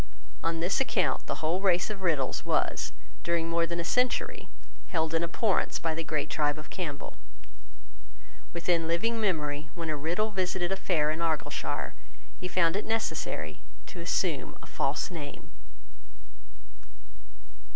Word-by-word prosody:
On 165 0 0
this 180 +9 +2
account 270 - +1
the - - -2
whole 175 +4 +2
race 180 0 +3
of 200 -2 -6
Riddells 155 -8 +1
was, - - +1 0.3
during 170 -1 +1
more 170 0 +2
than 170 +1 -2
a - - 0
century, 250 +8 +1 0.4
held 160 -3 0
in 165 +1 +3
abhorrence 190 +4 +2
by 165 -1 0
the 165 +1 -2
great 155 -1 0
tribe 145 -1 +1
of 155 - -9
Campbell. 155 -6 -4 1.3
Within 170 -1 +1
living 225 +8 +1
memory, 150 -6 0
when 165 -2 -2
a - - 0
Riddell 175 +9 0
visited 185 -2 0
a - - +3
fair 155 -5 +2
in 155 - -2
Argyleshire, 160 -4 -1 0.5
he 180 - -2
found 170 -2 +3
it 205 - +1
necessary 160 - -1 0.2
to 180 - -9
assume 170 -4 0
a - - -9
false 140 +5 0
name. 150 -5 -7
170 Hz, 145 wpm, -30 LUFS, 155-185 Hz, 1.3 s, race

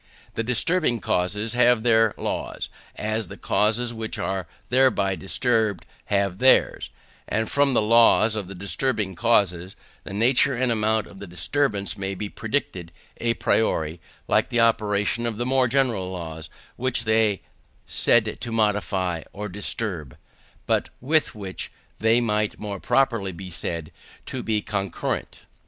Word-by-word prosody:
The - - -2
disturbing 125 +3 +1
causes 105 +4 0
have 120 -2 +4
their 115 -2 +4
laws, - - -4 0.3
as 110 -1 -1
the - - -10
causes 115 +3 +1
which 110 -1 -5
are 95 -2 -2 0.2
thereby 125 -6 +3
disturbed 110 -1 0 0.2
have 100 -2 0
theirs; 130 0 +4 0.4
and 110 +1 -1
from 140 -2 +2
the 110 - +3
laws 115 0 +5
of 105 -4 -3
the 100 - -8
disturbing 100 +1 -1
causes, 95 -3 +1 0.3
the - - -9
nature 125 +5 +3
and 125 0 +1
amount 110 -1 +1
of 95 - -14
the 100 - -8
disturbance 100 - -1
may 95 0 -3
be 105 +2 -5
predicted 105 -9 -3 0.3
à 115 -1 0
priori, 80 -7 +1 0.3
like - - +2
the 120 - 0
operation 110 0 +2
of 110 -3 -3
the 120 - -2
more 130 0 +3
general 120 -7 +1
laws 80 -3 -6 0.3
which 125 -2 0
they 110 -1 +3
are - - -19 0.5
said 110 -2 +2
to 120 - -5
modify 100 -5 0
or 105 +1 -5
disturb, 95 - -3 0.5
but - - +1
with 150 +2 +1
which 95 -3 -6 0.3
they 110 +2 +4
might 105 -3 0
more 100 -2 -5
properly 115 -7 +1
be 95 +1 -9
said 85 -2 -4 0.3
to 130 - -4
be 110 -3 -1
concurrent. 100 -4 -3
110 Hz, 145 wpm, -24 LUFS, 95-120 Hz, 0.5 s, laws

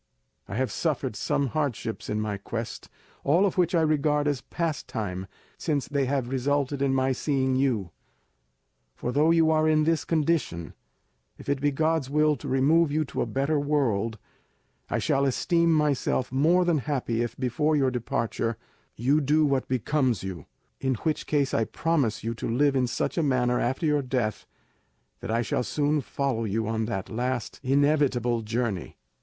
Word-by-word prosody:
I 100 - -6
have 130 +2 0
suffered 140 -7 -1
some 140 +5 0
hardships 130 -6 -3
in 105 - -1
my 105 -2 -2
quest, 115 +3 -6 0.3
all 170 +8 +4
of 195 - 0
which 180 -1 +2
I 165 - +4
regard 150 -1 +2
as 145 -4 0
pastime 110 - -3 0.3
since 145 -5 -1
they 140 -2 0
have 130 -2 -1
resulted 140 +1 0
in 140 -1 +2
my 135 0 +2
seeing 130 0 0
you; 120 -10 0 1.0
for, 125 - -3
though 150 +4 +3
you 165 -1 +4
are 155 0 +3
in 155 0 +3
this 165 0 +1
condition, 150 - -1 0.6
if - - -13
it 140 -1 0
be 145 - +3
God's 155 -1 0
will 150 +1 +3
to - - -8
remove 145 +4 +3
you 155 +1 +1
to - - -4
a - - 0
better 140 +3 0
world, 115 -7 0 0.7
I - - 0
shall 135 - +1
esteem 170 +5 +2
myself 150 -5 +1
more 165 +7 +3
than 170 -3 +2
happy 125 -5 -1
if 120 - -3
before 135 +5 +1
your 135 -3 +2
departure 115 -1 -2 0.4
you 140 +7 +2
do 150 +2 +3
what 135 -2 0
becomes 130 - 0
you, 90 -5 -6 0.3
in 130 -1 0
which 155 +7 -2
case 145 -3 +1
I 115 - +2
promise 140 -11 0
you 115 +1 -2
to 115 - -5
live 140 +4 +2
in 130 -2 +2
such 145 - -1
a - - +3
manner 125 -4 +1
after 130 +7 -1
your 150 -1 +2
death 125 -5 -2 0.7
that - - -7
I 115 +2 +1
shall 110 - -1
soon 145 +3 0
follow 135 -3 -2
you 110 +1 -1
on 110 0 -1
that 95 -4 -3
last 120 +1 -2
inevitable 135 -4 +2
journey. 110 -4 -3
135 Hz, 170 wpm, -26 LUFS, 120-150 Hz, 1.0 s, all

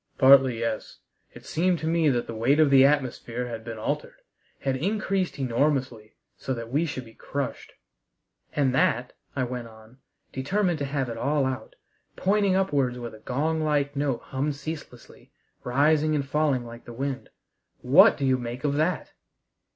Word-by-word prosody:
"Partly, 130 -2 +6
yes. 115 -1 -3 0.3
It - - -14
seemed 180 +2 +1
to 160 - -4
me 165 -2 +3
that 120 -3 0
the 115 - -7
weight 120 +7 +2
of 155 -3 +5
the 135 -1 +7
atmosphere 125 -4 0
had 115 -2 -6
been 115 -1 -7
altered 110 - -4 0.4
had 135 -1 0
increased 195 +3 -1
enormously, 130 -3 -1 0.2
so 130 - -4
that 115 0 -7
we 155 +5 +1
should 130 -4 -5
be 115 - -15
crushed." 140 +2 -5 0.8
"And 135 -3 +2
that," 125 -1 +1 0.2
I 130 - 0
went 125 -1 -4
on, 110 +3 -17 0.3
determined 175 +5 0
to 140 - -1
have 135 -1 -2
it 115 -1 -5
all 140 +2 +1
out, 130 -4 -4 0.4
pointing 200 0 +2
upwards 140 -10 +1
where 120 -1 -6
the 110 - -13
gong 155 +8 -1
like 145 -2 0
note 140 -4 -1
hummed 140 +2 -2
ceaselessly, 145 -4 -9 0.3
rising 150 +4 +2
and 140 -2 -1
falling 145 -4 +1
like 120 0 -11
wind. 135 +3 -4 0.5
"What - - +6
do 140 - -1
you 130 -1 +2
make 120 +1 -6
of 145 -1 +1
that?" 160 +4 0
135 Hz, 165 wpm, -26 LUFS, 120-150 Hz, 0.8 s, the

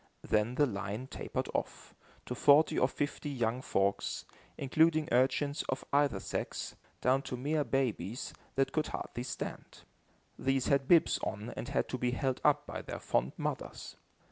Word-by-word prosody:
Then 110 +3 +2
the 145 - +5
line 100 0 -3
tapered - - -4
off, - - -4 0.3
to - - -3
forty 145 +5 +5
or 125 - +4
fifty 145 +2 -3
young 120 -2 -1
folks, 100 -4 0 0.3
including 155 +3 +3
urchins 135 +4 +2
of 130 - -2
either 140 -8 +3
sex, - - -4 0.3
down 130 +2 +3
to 125 - -5
mere 150 +4 +1
babies, 120 -4 -1 0.2
that 135 0 +2
could 155 - 0
hardly 120 - -5
stand. 125 - -6 0.6
These 135 -1 +1
had 140 -1 +3
bibs 170 -1 +5
on 110 +1 -4
and - - -5
had - - 0
to 130 - -3
be 125 - +1
held 130 0 -1
up 145 0 +4
by - - -5
their - - -6
fond 65 - 0
mothers. - - -4
130 Hz, 160 wpm, -32 LUFS, 120-145 Hz, 0.6 s, the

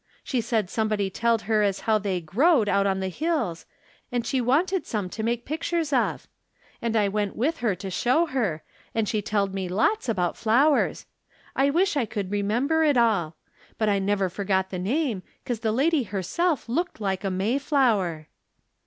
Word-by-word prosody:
She 255 -3 -1
said 220 -3 0
somebody 210 -1 -1
telled 230 +2 +1
her 215 +1 +2
as 200 -2 0
how 220 -1 +2
they 195 -3 -1
growed 225 - +3
out 200 0 +2
on 190 -1 0
the 190 - -1
hills, 240 - -2 0.4
and 240 -1 -1
she 260 +1 0
wanted 330 +10 +1
some 200 -5 -3
to 220 - -5
make 235 +1 -1
pictures 320 0 -2
of. 255 - 0 0.5
And 230 -1 -1
I 210 -2 +3
went 205 0 -2
with 310 +8 0
her 225 -5 0
to 190 +1 -7
show 255 - +2
her, 220 - -2 0.3
and 225 -2 +1
she 215 -2 0
telled 200 -1 -1
me 190 -2 -3
lots 225 - +1
about 180 -6 0
flowers. 270 +7 +2 0.5
I 275 +1 +3
wish 355 +5 +2
I 270 -5 +1
could 200 -2 -4
re 205 0 0
member 265 +11 +1
it 295 -4 +3
all. 200 -9 +2 0.4
But 215 -1 +1
I 200 -1 +2
never 195 0 +1
forgot 190 0 -1
the 185 - -3
name, 235 - -1 0.2
'cause 240 -3 -2
the 220 -1 0
lady 290 +6 +2
herself 240 - -1
looked 335 +8 -2
like 195 -2 -2
a 195 - 0
Mayflower." 210 - +1
220 Hz, 185 wpm, -25 LUFS, 195-270 Hz, 0.5 s, growed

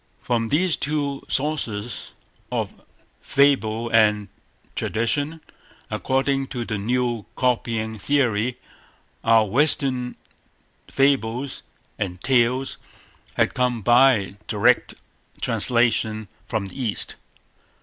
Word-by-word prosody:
From 115 -2 0
these 165 +6 +2
two 145 -2 -2
sources 125 -7 -2 0.4
of - - -3 0.4
fable 120 -5 +2
and 105 -2 +3 0.5
tradition, 145 +8 -1 0.5
according 135 +1 0
to 120 -3 -4
the 105 -2 -3
new 120 0 -1
copying 115 -3 -1
theory, 125 -2 +1 0.7
our 115 -1 +5
Western 130 +1 +2 0.7
fables 135 -1 +1 0.4
and 90 -3 -3
tales 130 +2 +1 0.6
had - - +2
come 125 -3 0
by 120 -4 +4
direct - - +2 0.4
translation 110 -3 +1 0.2
from 110 -4 -2
the 100 +7 -7
East. 110 -5 -2
120 Hz, 90 wpm, -23 LUFS, 110-135 Hz, 0.7 s, our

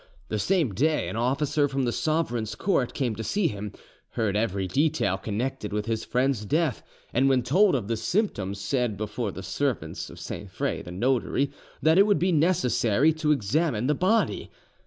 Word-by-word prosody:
The 110 - -1
same 165 - +1
day 150 - +1
an 95 - -5
officer 140 +5 +1
from 135 -1 -1
the 120 - +1
sovereign's 120 -8 -1
court 170 -11 0
came 125 -5 0
to 110 - -4
see 195 - +1
him, 105 -3 -6 0.4
heard 110 -4 0
every 100 -3 0
detail 145 - +1
connected 110 +3 -3
with 105 0 -2
his 110 0 -2
friend's 125 -3 0
death, 150 +3 0 0.3
and 135 +3 +3
when 130 -2 +3
told 185 - +4
of 115 -7 -2
the 115 - 0
symptoms 110 - -1
said 115 +1 -1
before 105 +1 -3
the 95 - -8
servants 140 +3 -2
to - - -12
Sainfray - - -4
the - - -10
notary 130 +6 0 0.3
that 160 +3 +5
it 200 - +6
would 205 - +4
be 180 +2 +1
necessary 150 - +3
to 155 -1 0
examine 125 0 +1
the 150 - +3
body. 190 +9 +1
125 Hz, 180 wpm, -26 LUFS, 110-155 Hz, 0.4 s, it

